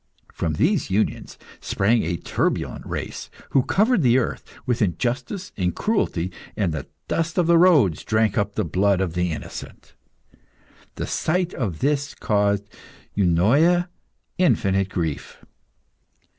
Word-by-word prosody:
From 80 -2 -2
these 155 - +1
unions 100 +3 -1 0.2
sprang 110 +4 +1
a 85 +1 -2
turbulent - - -2
race, - - -5 0.2
who 135 - +4
covered 215 - +2
the 125 -2 +4
earth 130 - -1 0.2
with 125 -1 0
injustice 125 - -2
and 90 -3 -1
cruelty, 95 - 0 0.3
and 95 -6 0
the 75 - -5 0.2
dust 165 -1 -1
of 180 - +3
the 170 0 +5
roads 145 - +4
drank 110 -2 +1
up 105 -1 -1
the 110 - 0
blood 95 +3 +2
of 95 -4 -1
the 90 0 0
innocent. 80 - -8 1.0
The - - -3
sight 175 +2 -1
of 100 - -3
this 140 0 0
caused 100 -1 +1 0.5
Eunoia 130 - +3 0.5
infinite 100 - +2
grief. 80 -6 -3
110 Hz, 130 wpm, -23 LUFS, -, 1.0 s, the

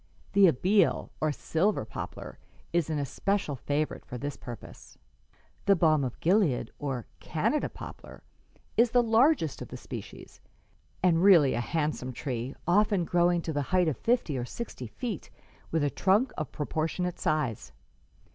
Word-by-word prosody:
The 200 -1 +7
Abele, 185 +7 +2
or 155 -1 +2
silver 160 - 0
poplar, 110 - -7 0.3
is 170 -2 +1
an 155 - -1
especial 150 +3 -1
favorite 145 +5 -2
for 125 - -7
this 145 +3 -4
purpose. 120 -3 -11 0.7
"The 200 - +6
balm 155 -4 +3
of 125 -3 -4
Gilead, 165 - +2
or 135 -5 -3
Canada 165 - 0
poplar, - - -11 0.5
is 235 +1 +5
the 245 +1 +4
largest 230 - +3
of - - -6
the - - -8
species, - - -9 0.6
and 170 -2 +4
really 175 -8 +6
a 120 - 0
handsome 150 -2 -2
tree, 125 0 -4
often 200 0 +3
growing 175 0 +2
to 160 - -3
the 145 - 0
height 180 -1 +3
of 155 - +1
fifty 225 - 0
or - - -2
sixty 130 - -6
feet, 220 - -5 0.4
with 160 -2 0
a 145 - +1
trunk 205 +7 +2
of 155 - -4
proportionate 160 +4 -2
size. 150 -8 -1
160 Hz, 150 wpm, -29 LUFS, 140-195 Hz, 0.7 s, The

